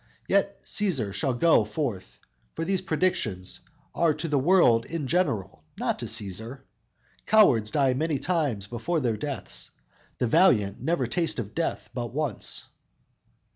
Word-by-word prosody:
Yet 200 0 0
Cæsar 140 - 0
shall 125 +5 0
go 160 -3 +4
forth, 105 -3 -4 0.4
for 165 - -3
these 190 0 0
predictions 115 - -1 0.3
Are 165 -3 +2
to 160 +2 -3
the 145 -3 +1
world 130 -7 +4
in 165 -3 -3
general, 110 - -1
not - - -1
to - - -4
Cæsar! 115 +4 -3 0.7
Cowards 155 - +5
die 135 +2 +2
many 155 +3 0
times 145 - -1
before 120 +10 -2
their 120 -6 0
deaths; 105 - -5 0.5
The - - 0
valiant 115 - +3
never 160 -6 0
taste 165 +7 -1
of 110 -3 -5
death 165 - -3
but 120 -1 -5
once!" 150 -8 -2
135 Hz, 140 wpm, -26 LUFS, 110-165 Hz, 0.7 s, Cowards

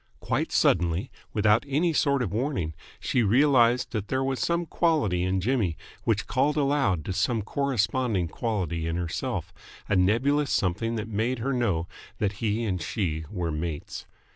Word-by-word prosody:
Quite - - -1
suddenly, 85 +2 +2 0.2
without 105 +1 +3
any 160 +5 +1
sort 140 -3 +2
of 100 - -3
warning, 110 - -1 0.3
she 125 - +1
realised 125 +1 +4
that 105 -4 -3
there 130 +1 0
was 135 -2 -1
some 170 +8 0
quality 150 - +1
in 95 +1 +1
Jimmy 105 -7 0 0.3
which 110 -2 +1
called 145 +3 +1
aloud 135 - +1
to 95 - -2
some 105 +3 0
corresponding 120 -6 0
quality 85 -5 -2
in 80 - -1
herself 85 -2 -3 0.3
a 105 - +1
nebulous 130 +10 +2
something 110 +5 0
that 110 -1 -3
made 115 +4 -1
her 135 +4 -1
know 100 -10 0 0.3
that 100 -2 0
he 110 +1 0
and 95 -6 -1
she 80 -3 -2
were 90 -5 -2
mates. 75 0 -5
110 Hz, 160 wpm, -27 LUFS, 90-130 Hz, 0.3 s, realised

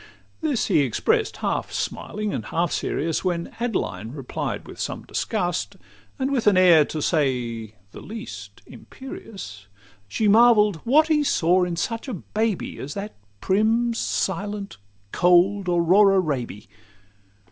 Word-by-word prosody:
This 295 -7 0
he 175 -6 +3
express'd 130 -6 0
half - - -1
smiling 210 -1 -3
and - - -4
half 170 0 -1
serious; 160 +1 -1
When 175 -2 -2
Adeline 195 - -3
replied 135 -4 -5
with - - -11
some - - -4
disgust, 165 - -2 0.4
And 265 +1 -1
with 250 -6 0
an 200 -3 +5
air, 175 -5 +6
to 155 0 -4
say 120 - -1 0.2
the - - -11
least, 225 +2 -9
imperious, 195 - -10 0.4
She 215 - 0
marvell'd 210 -3 +5
'what 300 - +3
he 300 -2 +3
saw 180 - +2
in 175 -1 -3
such 230 +8 -3
a 255 - -3
baby 215 +2 -3
As 145 +2 -6
that 205 +2 -5 0.3
prim, 225 +4 +2
silent, 200 - -3 0.3
cold 180 +2 +3
Aurora 190 +3 +4
Raby? 125 - -3
190 Hz, 135 wpm, -23 LUFS, 160-220 Hz, 0.4 s, air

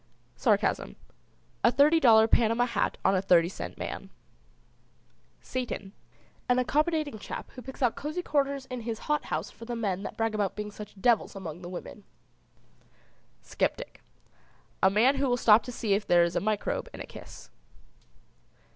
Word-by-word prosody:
SARCASM. - - +1 0.7
A 235 - +6
thirty 295 +5 +5
dollar 225 -6 +6
Panama 230 +1 +3
hat 245 - -1
on - - +4
a 185 - +2
thirty 175 -3 +4
cent - - -7
man. - - -6 1.3
SATAN. 240 -6 -4 0.6
An 250 - +4
accommodating 300 -1 0
chap - - -7
who 255 - -10
picks 265 +1 -7
out 240 - +2
cosey 300 +5 -4
corners 280 -3 0
in 255 -2 -6
his 225 -1 -4
hot 300 -1 0
house 160 +6 -3
for 230 - -12
the 240 0 -4
men 200 -5 -2
that - - -7
brag 225 -1 0
about 205 -3 -1
being 210 0 -5
such 210 -1 -11
devils 230 -1 +2
among 175 -3 -7
the 175 - -8
women. 185 +3 -8 1.4
SCEPTIC. - - -3 0.8
A 190 - +6
man 235 +8 +3
who 275 0 +1
will 245 - +2
stop 220 -2 +6
to 250 - -8
see 220 -4 -1
if 205 +1 -1
there 175 -1 +5
is 170 0 -1
a - - +3
microbe 215 - -2
in - - -10
a - - -6
kiss. - - -12
225 Hz, 165 wpm, -28 LUFS, 200-260 Hz, 1.4 s, A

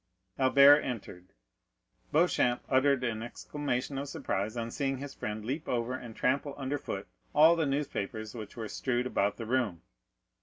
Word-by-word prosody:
Albert 140 +2 +8
entered. 100 -9 -6 0.8
Beauchamp 150 -6 +2
uttered 135 0 +3
an 115 -3 -1
exclamation 135 +2 -3
of 140 0 -5
surprise 105 0 -2
on 115 0 -3
seeing 135 0 -1
his 140 +1 -7
friend 105 0 -5
leap 145 +7 -3
over 120 0 -1
and 120 -3 -7
trample 140 +2 0
under 140 +1 -2
foot 100 -5 -5 0.3
all 160 +3 +7
the 160 -3 0
newspapers 110 -6 -3
which 110 0 -8
were 110 -2 -4
strewed 125 +2 -1
about 100 -5 0
the 115 - -5
room. 115 -8 0
130 Hz, 155 wpm, -30 LUFS, 110-140 Hz, 0.8 s, Albert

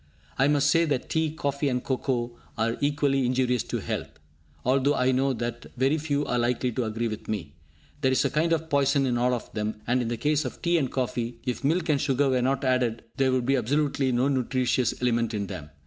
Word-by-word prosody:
I 135 - +5
must 145 -1 +3
say 165 +2 +4
that 140 -5 -2
tea, 160 -1 +1
coffee 140 -2 -1
and 125 -1 -1
cocoa 125 -3 -1 0.2
are 115 +1 +1
equally 145 -2 +2
injurious 125 -1 +1
to - - -3
health, - - -4 0.6
although 135 +3 +3
I 125 +1 +2
know 135 +1 +2
that 120 -1 -4
very 135 +5 +2
few 145 -1 -1
are 125 - 0
likely 125 +1 0
to 120 +1 -1
agree 110 +2 -2
with 110 -2 -6
me. 90 -9 -4 0.5
There 130 - +3
is 130 - +2
a 140 - +1
kind 160 +3 +1
of 160 -1 +1
poison 140 -2 +2
in 120 -2 0
all 125 +1 +2
of 120 - -8
them; 105 0 -2
and, 125 +1 +1
in 120 - -2
the 120 0 -2
case 150 +4 +1
of 130 - -6
tea 170 -1 +2
and 130 -4 -1
coffee, 120 -2 -2
if 125 0 -3
milk 160 +4 +1
and 145 -2 +2
sugar 140 -1 +2
were 130 -1 +2
not 135 +2 0
added, 125 -3 +1
there 135 -1 +3
would 130 -1 +1
be 135 +2 +3
absolutely 135 +2 +1
no 125 +2 +2
nutritious 130 -2 0
element 115 -2 +1
in 100 -1 -2
them. 90 -7 -7
130 Hz, 225 wpm, -26 LUFS, 120-140 Hz, 0.6 s, I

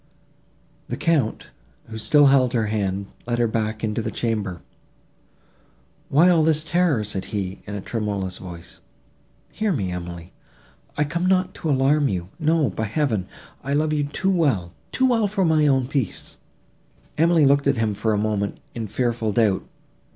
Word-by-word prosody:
The - - -4
Count, 145 -10 0 0.3
who 110 0 -8
still 145 +7 +5
held 135 -2 +4
her 115 -3 +1
hand, 100 -2 -1 0.2
led 120 0 0
her 120 - +2
back 110 0 -2
into 110 +1 -1
the - - -3
chamber. 105 -7 -3 1.5
"Why 155 +6 +5
all 175 -3 +5
this 155 -1 +2
terror?" 165 -8 +1
said 100 -2 -4
he, 95 -2 -4
in 105 - -5
a 100 - -4
tremulous 100 -4 -3
voice. 85 -2 -10 0.7
"Hear 215 -1 -1
me, 100 - -1
Emily: 85 -1 -7 0.6
I 150 - +3
come 170 +5 -1
not 185 -1 +2
to 160 - -4
alarm 140 +2 +3
you; 90 -4 -3
no, 155 -6 +2
by 110 - -3
Heaven! 110 - -1 0.4
I 140 +1 -2
love 155 +1 +1
you 145 -1 +1
too 190 +7 -1
well—too 145 - 0
well 225 -4 +2
for 195 -2 0
my 155 -2 +3
own 135 -2 +3
peace." 130 -5 -4 0.8
Emily 165 -2 +5
looked 140 +1 +3
at 140 -2 +2
him 110 -2 0
for 110 +2 -1
a 105 - +1
moment, 105 -1 -1
in 115 -2 -4
fearful 115 0 -1
doubt. 105 -3 +2
120 Hz, 165 wpm, -23 LUFS, 105-155 Hz, 1.5 s, still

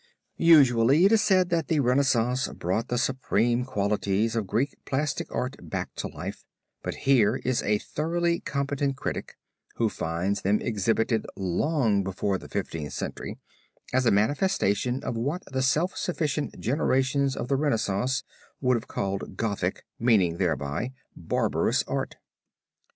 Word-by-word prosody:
Usually 140 -2 +6
it 200 - +5
is 225 -1 +5
said 185 -4 +3
that 165 -3 +1
the 160 - +2
Renaissance 125 -1 +2
brought 95 +7 -2
the 120 - -1
supreme 120 -2 +1
qualities 105 -1 0
of 110 -4 -1
Greek 125 +9 0
plastic 140 +1 -2
art 125 +2 -2
back - - -3
to - - -3
life, - - -7 0.4
but - - -4
here 120 -5 +4
is 130 -2 +1
a 105 0 +2
thoroughly 170 +7 -1
competent 140 -1 -2
critic - - -4 0.4
who 115 -2 +1
finds 90 +3 -2
them 100 +2 +2
exhibited 115 +1 0
long 105 - +1
before 95 +1 -1
the - - -12
Fifteenth 75 -4 -4
Century, - - -5 0.6
as 130 -1 +3
a - - +5
manifestation 125 - +1
of - - -3
what 145 +11 -2
the 130 0 0
self 155 +8 +1
sufficient 155 -4 -2
generations 135 +1 +1
of - - -4
the 140 - +1
Renaissance 125 -3 0 0.4
would 125 -2 +2
have 115 - -7
called 95 -1 -3
Gothic, 100 -4 -2
meaning 100 -8 +3
thereby, 80 - -1 0.2
barbarous - - 0
art. - - -3
125 Hz, 140 wpm, -27 LUFS, 100-140 Hz, 0.6 s, Usually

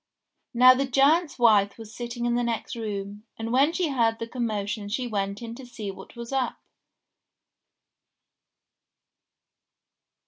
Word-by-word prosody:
Now 255 +2 +8
the 270 +1 -1
giant's 290 +5 +3
wife 210 -5 +4
was 225 -1 -11
sitting 240 0 -4
in 240 - +1
the 240 - +1
next 235 -1 -3
room, 205 -2 -5 0.2
and 225 0 -4
when 275 +5 +4
she 345 -2 -1
heard 230 -4 +1
the 230 - -4
commotion 215 -4 -3
she 250 +4 -2
went 200 -1 -3
in 230 0 -6
to 265 - -10
see 240 -5 -6
what 190 +4 -13
was 235 +1 -8
up. 265 -2 -1
235 Hz, 140 wpm, -26 LUFS, 210-255 Hz, 0.2 s, Now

